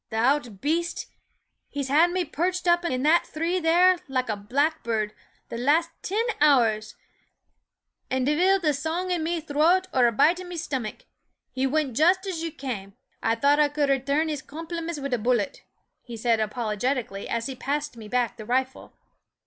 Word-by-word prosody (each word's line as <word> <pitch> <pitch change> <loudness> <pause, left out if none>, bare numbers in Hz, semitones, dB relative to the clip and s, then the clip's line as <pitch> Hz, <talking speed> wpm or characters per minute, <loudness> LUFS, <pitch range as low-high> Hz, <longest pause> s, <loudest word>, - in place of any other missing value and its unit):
" - - -63
Th' - - -6
ould 240 -3 +1
baste! 335 +4 -1 0.6
he 285 - -3
's - - -4
had 310 +6 +4
me 360 0 -1
perrched 360 +4 -2
up 345 0 +4
in 260 -6 -1
that 320 +3 +4
three 335 +4 -1
there, 355 +2 +4
like 255 -3 -1
a 215 - 0
blackburrd, 230 -1 -1 0.4
the 230 - -5
last 315 +6 +2
tin 430 +5 -1 0.2
hours; 225 -7 +3 1.1
an' 260 0 0
divil 355 +8 +3
th' 310 -5 +1
song 325 +6 -2
in 350 -2 0
me 335 +2 -1
throat 320 +5 +2
or 250 -2 +5
a - - +2
bite 310 +10 +3
in 365 - -8
me 355 -1 -6
stomach. 265 -9 -4 0.5
He 260 +1 0
wint 280 -3 -1
just 360 - +3
as 365 -4 -3
you 330 -1 -3
came 210 -9 -6 0.3
I 225 - +1
thought 285 +5 +3
I 295 -1 +4
could 290 -1 0
returrn 280 +4 +1
his 300 -3 -3
compliments 330 +1 -6
wid 275 -2 -3
a 245 - +1
bullet," 235 -2 0 0.4
he 235 -2 -9
said, 230 0 +1
apolo 215 0 -2
getically, 245 -6 -2
as 230 0 -2
he 270 - -3
passed 285 +2 -3
me 220 -2 -10
back 245 0 -1
the 215 - -8
rifle. 260 +3 -2
285 Hz, 190 wpm, -25 LUFS, 245-330 Hz, 1.1 s, or